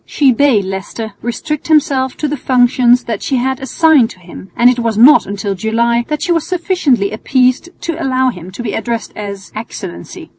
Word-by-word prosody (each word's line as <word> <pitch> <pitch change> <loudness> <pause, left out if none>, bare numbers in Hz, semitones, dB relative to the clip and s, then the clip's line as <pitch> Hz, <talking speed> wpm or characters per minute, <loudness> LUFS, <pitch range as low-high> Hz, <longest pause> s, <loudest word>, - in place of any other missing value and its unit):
She 280 -3 +2
bade 240 -5 +2
Leicester 195 +3 -6
restrict 290 +6 -4
himself 275 -4 +1
to 305 - -1
the 295 - -2
functions 245 -1 +3
that 225 -3 -4
she 275 - -1
had 260 +1 -1
assigned 280 -2 +3
to - - -13
him, 180 +2 -12
and 240 - +5
it 250 0 +3
was 230 -3 -1
not 275 +7 +6
until 200 0 -3
July 235 +4 0
that 300 -1 -3
she 350 - -1
was 330 -1 0
sufficiently 340 - 0
appeased 255 +7 +1
to 335 -1 -4
allow 260 -1 +1
him 180 -4 -10
to 240 - -6
be 220 - -3
addressed 230 0 -3
as 200 -1 -7
"Excellency." 85 - -8
245 Hz, 190 wpm, -15 LUFS, 220-280 Hz, -, not